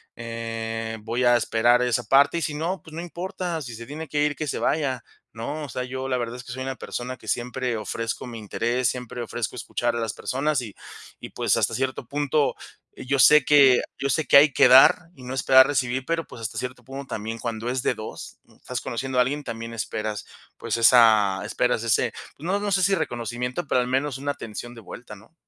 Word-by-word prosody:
Eh, 115 -1 -5
voy 115 +3 -2
a 120 0 +6
esperar 120 +2 +3
esa 120 -1 +1
parte, 140 +5 +4
y - - -6
si 155 - -2
no, 170 +5 -2
pues 160 - -14
no 165 - -5
importa, 175 -1 -4
si 120 -4 -7
se 115 +1 -9
tiene 155 +4 -7
que 145 +1 0
ir 150 -1 0
que 155 - -3
se - - -2
vaya, 135 -6 0 0.3
¿no? 145 +7 -5
O - - -10
sea, 125 - -4
yo 130 +1 -5
la 130 - +1
verdad 120 0 -4
es 125 - -9
que - - -8
soy 130 +1 -5
una 135 0 -4
persona 125 +1 -6
que - - -16
siempre 125 0 -2
ofrezco 115 +3 -4
mi 115 -2 -7
interés, 120 +3 -1
siempre 125 -1 -5
ofrezco 115 - -4
escuchar 120 -1 -2
a 120 - -2
las 115 -3 -2
personas, 140 +1 -1
y 105 -5 -9 0.4
y - - -8
pues, - - +1
hasta - - +1
cierto 130 -1 -2
punto, 145 +1 0 0.4
yo 135 +2 -2
sé 150 0 +7
que 135 -4 +6 0.2
yo 140 - -1
sé 155 +4 +1
que - - +4
hay 145 +1 +7
que - - +6
dar 135 +6 +7
y 130 - -14
no 125 - -6
esperar 130 0 +6
recibir, 130 -2 -1
pero, 165 0 -1
pues, 115 - -11
hasta 115 0 -5
cierto 125 0 -5
punto, 135 +3 -8
también 110 +2 -5
cuando 115 0 -4
es 130 +1 -1
de - - +2
2 110 0 -8 0.2
estás - - -5
conociendo 130 +2 -2
a - - +7
alguien, 145 +4 -1
también 115 0 -6
esperas, 110 -1 -4 0.3
pues, - - -2
esa 110 -5 +5
esperas 125 +2 0
ese, 115 - +2 0.3
pues, 150 - -11
no 195 +3 0
no 205 0 -2
sé 190 - +2
si 195 +2 +3
reconocimiento, 125 - -3
pero 130 - +2
al 125 - -2
menos 135 +1 -1
una 140 +2 -2
atención 120 0 -8
de 115 - -11
vuelta, 110 +1 -10
¿no? 105 +9 -19
125 Hz, 225 wpm, -24 LUFS, 115-140 Hz, 0.4 s, sé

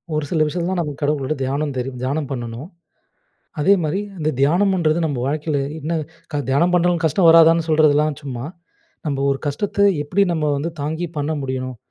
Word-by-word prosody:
"ஒரு 150 - 0
சில 160 -3 +2
விஷயத்துலலாம் 175 +3 -2
நமக்கு 150 -2 -6
கடவுள 145 -1 +1
விட 155 +3 -1
தியானம் 140 +2 -1
தெரியு 125 +1 -3
தியானம் 140 +2 -2
பண்ணணும். 120 +5 -5 0.9
அதே 195 +7 +5
மாதிரி 155 +6 -1 0.2
அந்த 155 -1 -1
தியானம்ன்றது 170 +2 +2
நம்ப 140 -5 -2
வாழ்க்கையில 150 0 -1 0.2
என்ன 160 +3 -2 0.4
க 145 - 0
தியானம் 170 +7 +2
பண்ணாலும் 175 -1 +2
கஷ்டம் 165 +3 +3
வராதான்னு 165 0 +6
சொல்றதெல்லாம் 150 -1 +3
சும்மா. 125 -2 -5 0.6
நம்ம 140 -1 -1
ஒரு 135 - -2
கஷ்டத்த 200 +7 -2 0.2
எப்படி 180 +7 0
நம்ம 150 -2 0
வந்து 160 +4 -2
தாங்கி 160 +4 -2
பண்ண 145 +2 -1
முடியணும்? 130 -2 -4
150 Hz, 165 wpm, -20 LUFS, 140-170 Hz, 0.9 s, வராதான்னு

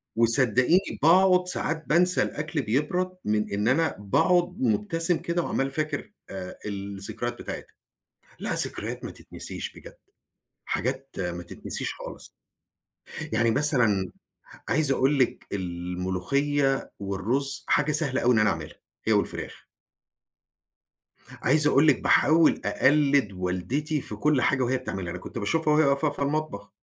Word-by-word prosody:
وصدقيني 125 - +3
باقعد 180 +3 +5
ساعات 165 -2 -1
بانسى 180 +3 +3
الأكل 150 0 -3
بيبرد 150 +10 -1
من 105 -1 0
إن 105 +2 0
أنا 160 +5 +2
باقعد 175 - +1
مُبتسم 205 -8 +1
كده 170 +2 -2
وعمّال 135 -3 -1
فاكر 155 +7 -3 0.2
آآ 95 -1 -7
الذكريات 100 +3 -4
بتاعتها. - - -7 0.6
لها - - -2
ذكريات - - 0
ما - - -5
تتنسيش - - -8
بجد، - - -13 0.7
حاجات 130 +2 -2
ما 90 -2 -3
تتنسيش 85 - -6
خالص. - - -10 1.0
يعني 115 0 +3
مثلًا، 115 -8 +2 0.6
عايز 155 -2 +2
أقول 135 +2 +2
لِك 130 - 0
الملوخية 95 +11 -1
والرز 115 +9 -2
حاجة 150 +1 +2
سهلة 145 -3 0
أوي 125 +1 +4
إن - - +3
أنا 110 0 +4
اعملها 80 -2 -5 0.3
هي - - +3
والفراخ. - - -2 1.8
عايز 150 +3 +4
أقول 145 +1 +4
لِك 145 - +4
باحاول 160 +1 +4
أقلد 140 +1 +3
والدتي 95 - -2
في 105 - -4
كل 145 +4 +2
حاجة 130 -1 +2
وهي 130 +1 +1
بتعملها، 95 -8 -5
أنا 90 - -6
كنت 90 - -9
باشوفها 150 +8 +1
وهي 155 0 +4
واقفة 140 +2 +2
في - - -6
المطبخ. 140 -8 -2
135 Hz, 130 wpm, -26 LUFS, 105-155 Hz, 1.8 s, باقعد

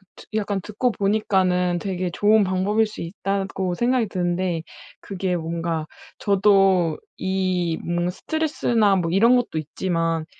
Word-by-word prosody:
드 - - -14
약간 205 -2 -1
듣고 215 +6 -1
보니까는 190 -4 +1
되게 185 -1 -3
좋은 210 +4 +4
방법일 190 +4 +1
수 210 - -9
있다고 195 +1 -2
생각이 240 +2 +1
드는데 175 -2 -1 0.4
그게 190 -2 -2
뭔가 165 -1 -3 0.3
저도 195 -5 +3 0.2
이 185 -3 -1
뭔가 175 +1 -1
스트레스나 235 - +1
뭐 170 -3 0
이런 230 +7 +5
것도 245 -9 -1
있지만 165 +1 -2
190 Hz, 275 characters per minute, -23 LUFS, 175-205 Hz, 0.4 s, 이런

